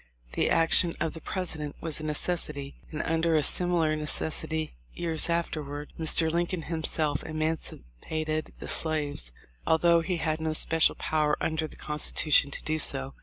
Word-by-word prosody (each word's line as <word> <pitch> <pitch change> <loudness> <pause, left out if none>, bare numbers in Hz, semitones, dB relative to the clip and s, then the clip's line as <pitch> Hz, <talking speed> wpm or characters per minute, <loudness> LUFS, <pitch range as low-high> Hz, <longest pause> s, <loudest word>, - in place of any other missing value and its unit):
The - - +1
action 165 +1 +5
of 165 - -2
the 165 - -8
President 160 -6 -4
was 160 -2 -3
a - - -7
necessity, 150 -2 -1 0.2
and 155 - -3
under 165 0 +1
a 155 - +3
simi 175 +5 +3
lar 155 -2 +1
necessity 155 +1 0 0.2
years 165 -1 0
afterward 150 -3 -3
Mr. 160 0 +4
Lincoln 170 0 -1
himself 155 -3 -1
emancipated 155 - -4
the - - -8
slaves, 145 - 0 0.4
although 170 +1 +4
he 180 +1 -2
had 160 -1 -1
no 160 0 -1
special 160 +1 +2
power 150 -1 0
under 160 0 -1
the - - -14
Constitution 150 -1 +2
to - - -4
do 155 0 -1
so. 135 -2 +1
155 Hz, 155 wpm, -27 LUFS, 150-165 Hz, 0.4 s, action